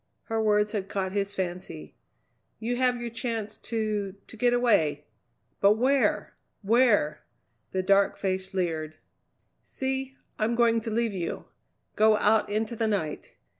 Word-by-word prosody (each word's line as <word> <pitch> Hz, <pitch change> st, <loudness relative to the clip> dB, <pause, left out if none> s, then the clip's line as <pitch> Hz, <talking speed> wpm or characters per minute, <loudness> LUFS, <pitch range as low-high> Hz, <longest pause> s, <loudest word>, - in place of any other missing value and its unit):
Her 225 Hz, -1 st, -1 dB
words 210 Hz, -1 st, +2 dB
had 200 Hz, -3 st, -3 dB
caught 190 Hz, -2 st, -2 dB
his 200 Hz, 0 st, -2 dB
fancy. 180 Hz, -3 st, -5 dB, 0.6 s
"You 235 Hz, +2 st, -2 dB
have 250 Hz, -1 st, +2 dB
your 240 Hz, -1 st, -5 dB
chance 225 Hz, -2 st, -3 dB
to 215 Hz, -4 st, -2 dB
to -, -, -12 dB
get 245 Hz, +2 st, +2 dB
away! 165 Hz, -12 st, +2 dB, 0.5 s
But 200 Hz, +1 st, +6 dB
where? 260 Hz, +5 st, +1 dB, 0.3 s
Where?" 220 Hz, -7 st, +3 dB, 0.5 s
The 185 Hz, 0 st, -1 dB
dark 195 Hz, +1 st, +3 dB
face 190 Hz, 0 st, -2 dB
leered. 160 Hz, -4 st, -2 dB, 0.7 s
"See! 265 Hz, 0 st, -4 dB, 0.2 s
I'm 225 Hz, +2 st, +1 dB
going 230 Hz, -1 st, +3 dB
to 225 Hz, -, -4 dB
leave 225 Hz, 0 st, 0 dB
you. 175 Hz, -3 st, -4 dB, 0.5 s
Go 215 Hz, 0 st, +5 dB
out 215 Hz, +1 st, +3 dB
into 215 Hz, +2 st, -1 dB
the 225 Hz, 0 st, 0 dB
night. 185 Hz, -8 st, -3 dB
215 Hz, 140 wpm, -27 LUFS, 190-235 Hz, 0.7 s, But